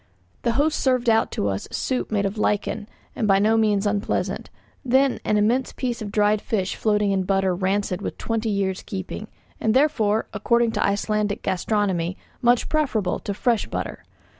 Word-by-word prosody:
The 235 Hz, -, +1 dB
host 300 Hz, +5 st, +1 dB
served 255 Hz, -3 st, +2 dB
out 225 Hz, -, +3 dB
to 100 Hz, -, -1 dB
us 100 Hz, 0 st, -2 dB
a -, -, -6 dB
soup 255 Hz, -1 st, -1 dB
made 205 Hz, -2 st, +1 dB
of 200 Hz, +2 st, -3 dB
lichen 210 Hz, +1 st, -1 dB, 0.3 s
and 225 Hz, -5 st, 0 dB
by 195 Hz, -1 st, +5 dB
no 215 Hz, +3 st, +3 dB
means 210 Hz, -2 st, +2 dB
unpleasant, 205 Hz, 0 st, -1 dB, 0.3 s
then 265 Hz, +1 st, +3 dB
an 210 Hz, -, +1 dB
immense 235 Hz, +5 st, +1 dB
piece 245 Hz, -3 st, -3 dB
of 205 Hz, -2 st, -5 dB
dried 210 Hz, 0 st, +2 dB
fish 195 Hz, -4 st, -1 dB
floating 210 Hz, -2 st, +1 dB
in 195 Hz, -1 st, +1 dB
butter 195 Hz, 0 st, +1 dB
rancid 190 Hz, +1 st, -1 dB
with -, -, -5 dB
twenty 225 Hz, -1 st, -2 dB
years' 195 Hz, -2 st, -1 dB
keeping, 195 Hz, +2 st, -6 dB, 0.3 s
and, 220 Hz, +1 st, +1 dB
therefore, 225 Hz, -7 st, +2 dB
according 235 Hz, +2 st, +2 dB
to 215 Hz, -, 0 dB
Icelandic 210 Hz, +1 st, 0 dB
gastronomy, 185 Hz, -2 st, 0 dB, 0.2 s
much 240 Hz, 0 st, +3 dB
preferable 245 Hz, -, 0 dB
to 200 Hz, -, -4 dB
fresh 235 Hz, 0 st, +1 dB
butter. -, -, -5 dB
210 Hz, 175 wpm, -23 LUFS, 200-230 Hz, 0.3 s, by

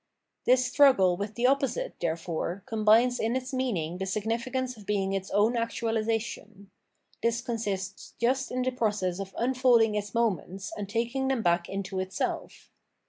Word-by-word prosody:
This 255 Hz, 0 st, +4 dB
struggle 250 Hz, -9 st, +5 dB
with 205 Hz, +3 st, -5 dB
the 240 Hz, -, 0 dB
opposite, 280 Hz, -, +1 dB
therefore, 170 Hz, +2 st, -3 dB
combines 225 Hz, +3 st, +3 dB
in 225 Hz, +2 st, 0 dB
its 260 Hz, 0 st, -3 dB
meaning 185 Hz, -10 st, -1 dB
the 190 Hz, -, -2 dB
significance 240 Hz, +5 st, -2 dB
of 210 Hz, -3 st, -15 dB
being 195 Hz, -2 st, 0 dB
its 195 Hz, 0 st, -3 dB
own 210 Hz, +4 st, +3 dB
actualisa 230 Hz, -1 st, 0 dB
tion. 200 Hz, -3 st, -10 dB, 0.5 s
This 235 Hz, 0 st, +1 dB
consists 205 Hz, -6 st, -4 dB
just 260 Hz, +3 st, +1 dB
in 255 Hz, 0 st, -1 dB
the 255 Hz, -, 0 dB
process 205 Hz, -7 st, -1 dB
of 195 Hz, -1 st, -6 dB
unfolding 245 Hz, -3 st, +3 dB
its 205 Hz, 0 st, -3 dB
moments 195 Hz, -4 st, -1 dB
and 200 Hz, -2 st, -5 dB
taking 235 Hz, +4 st, -1 dB
them 265 Hz, -4 st, 0 dB
back 170 Hz, -1 st, +2 dB
into 195 Hz, -1 st, -3 dB
itself. 185 Hz, 0 st, -4 dB
225 Hz, 155 wpm, -28 LUFS, 195-250 Hz, 0.5 s, struggle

